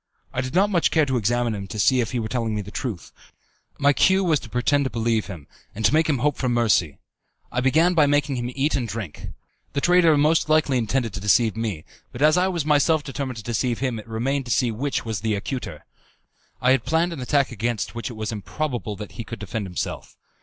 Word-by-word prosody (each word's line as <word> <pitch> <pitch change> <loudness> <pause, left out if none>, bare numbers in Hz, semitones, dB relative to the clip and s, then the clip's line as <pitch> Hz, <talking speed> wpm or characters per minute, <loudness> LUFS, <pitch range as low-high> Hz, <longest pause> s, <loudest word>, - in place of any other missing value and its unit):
I 130 - 0
did 130 +4 -5
not 200 +3 +3
much 175 -4 +3
care 155 -2 +3
to 135 -2 -1
examine 120 +1 +1
him 100 -2 -5
to 100 - -7
see 125 +4 +3
if 115 - -2
he 125 - -2
were 110 -2 -2
telling 115 -2 -2
me 105 - -2
the 100 - -10
truth. 105 - -5 0.7
My 145 0 +4
cue 190 +6 +3
was 160 -5 +2
to 115 - -11
pretend 140 +5 +1
to - - 0
believe 115 -2 0
him, 85 -8 -8 0.3
and 110 +1 -2
to 105 - +4
make 160 +1 +3
him 145 - +2
hope 145 +4 0
for 130 - -1
mercy. 105 - +2 0.5
I 125 - 0
began 160 +8 +3
by 155 -4 +4
making 145 -1 +1
him 120 0 -3
eat 140 +3 +1
and 125 -4 -1
drink. 105 -6 -6 0.5
The 140 - -1
traitor 175 -3 +5
most 155 +2 +2
likely 150 -4 +3
intended 115 0 -1
to 100 - -4
deceive 105 +2 +3
me, 110 -9 -3 0.3
but 120 - -3
as 155 0 +5
I 180 +1 +3
was 170 -5 -2
myself 150 +1 +3
determined 135 -3 -5
to 110 - -7
deceive 120 +1 -1
him 130 -4 -2
it 110 - -11
remained 130 +5 -1
to - - -9
be - - +3
seen 120 -4 0
which 140 -2 -1
was 110 -4 -3
the 110 -2 0
acuter. 100 - -5 0.7
I 125 - +3
had 135 - +3
planned 170 +2 +1
an 145 - -7
attack 140 +2 +1
against 120 -1 -2
which 120 +2 -4
it - - -7
was 110 0 -4
improbable 115 +1 -4
that 105 0 -8
he 115 - -7
could - - -7
defend 105 0 -4
himself. 90 -2 -5
125 Hz, 240 wpm, -23 LUFS, 110-145 Hz, 0.7 s, traitor